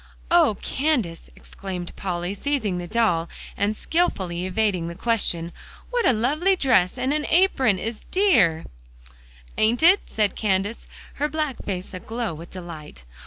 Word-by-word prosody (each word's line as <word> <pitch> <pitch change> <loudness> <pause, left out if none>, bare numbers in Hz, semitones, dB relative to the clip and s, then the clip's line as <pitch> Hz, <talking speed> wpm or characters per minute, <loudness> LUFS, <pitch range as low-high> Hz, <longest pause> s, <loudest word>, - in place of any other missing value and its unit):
"Oh, 325 - +5
Candace!" 255 - -1
exclaimed 185 -3 -7
Polly, 180 -1 -3
seizing 210 -5 -1
the 175 - -6
doll, 175 -7 +1 0.3
and 205 +2 0
skillfully 185 - -1
evading 185 -3 0
the 170 - -6
question, 180 -6 -1 0.4
"what 485 -2 +2
a - - +6
lovely 295 - +2
dress 240 - +2
and 255 +2 0
the 300 0 -1
apron 270 - +4
is 220 +3 -4
a - - -23
dear" 200 - +3 0.9
"Ain't 235 +7 +2
it?" 365 +4 +7
said 210 -3 0
Candace, 205 +1 -1 0.3
her 295 - +2
black 305 -4 -3
face 185 -2 -5
aglow 225 +2 -4
with 165 +3 -10
delight. 160 - -9
215 Hz, 145 wpm, -24 LUFS, 180-275 Hz, 0.9 s, it